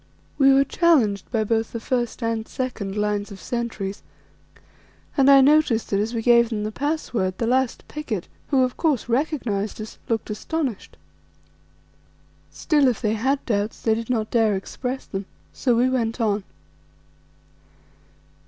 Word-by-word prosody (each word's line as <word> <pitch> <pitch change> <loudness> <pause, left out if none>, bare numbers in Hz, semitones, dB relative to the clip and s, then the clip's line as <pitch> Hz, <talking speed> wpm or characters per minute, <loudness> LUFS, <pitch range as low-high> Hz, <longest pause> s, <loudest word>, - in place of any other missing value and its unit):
We 270 -1 +6
were 270 0 +5
challenged 260 - +2
by 225 -2 +1
both 225 +1 -1
the 230 - -3
first 240 0 -2
and 225 -1 -1
second 215 -6 -4
lines 210 0 -1
of 195 - -9
sentries, 230 -5 -4 1.1
and 275 -1 +5
I 275 -1 +8
noticed 280 -5 +3
that 200 - +2
as 220 +3 -2
we 225 - -2
gave 235 -1 +5
them 215 -3 -2
the 215 - -3
password 245 -9 -2
the 230 - -1
last 255 +1 0
picket, 250 - -4 0.2
who 270 -3 +3
of 250 -1 -2
course 295 -10 0
recognized 240 -6 -1
us, 215 0 -8
looked 225 -1 -1
astonished. 255 +1 -4 1.5
Still, 295 -3 +2
if 245 - +1
they 215 -2 0
had 265 +6 0
doubts 210 -2 -1
they 220 - +2
did 230 +1 -4
not 220 -3 -1
dare 225 -3 +3
to - - 0
express 250 +6 -5
them. 195 0 -5 0.3
So 245 -3 +1
we 245 +2 +4
went 240 -2 -1
on. 210 -3 0
230 Hz, 155 wpm, -23 LUFS, 215-260 Hz, 1.5 s, I